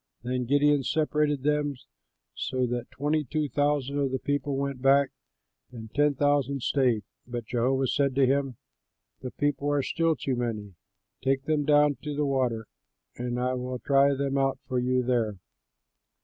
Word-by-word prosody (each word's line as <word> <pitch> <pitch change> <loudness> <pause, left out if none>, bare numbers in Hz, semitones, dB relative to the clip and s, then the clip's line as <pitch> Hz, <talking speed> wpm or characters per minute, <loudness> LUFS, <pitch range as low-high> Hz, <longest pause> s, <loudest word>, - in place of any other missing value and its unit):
'" - - -46
Then 125 0 -2
Gideon 145 +2 +3
separated 150 -1 0
them, 150 -1 +1 0.6
so 130 -1 -1
that 120 0 -3
twenty 145 +4 -1
two 150 +3 -2
thousand 145 -1 0
of 140 -1 +1
the 130 - -1
people 145 0 -2
went 140 -2 -3
back 135 +1 +4 0.6
home, 110 -2 -9
but - - -38
ten 145 0 +3
thousand 140 -1 +1
stayed. 125 -6 +2 0.2
But 120 -2 -5
Jehovah 130 +4 +1
said 140 +1 +1
to 135 -1 +4
him, 135 -2 0 0.6
"The 130 - -4
people 145 +1 -1
are 145 -1 +1
still 165 +2 +1
too 135 -1 -2
many; 110 -5 -3 0.5
take 135 0 +1
them 150 0 0
down 145 -2 +4
to 150 -1 -4
the 150 0 0
water, 125 -5 0 0.5
and 125 0 -3
I 125 +1 0
will 125 0 -3
try 140 +2 +3
them 140 0 -1
out 135 0 +1
for 130 -1 0
you 125 0 +1
there. 115 -5 0
135 Hz, 170 wpm, -27 LUFS, 125-145 Hz, 0.6 s, back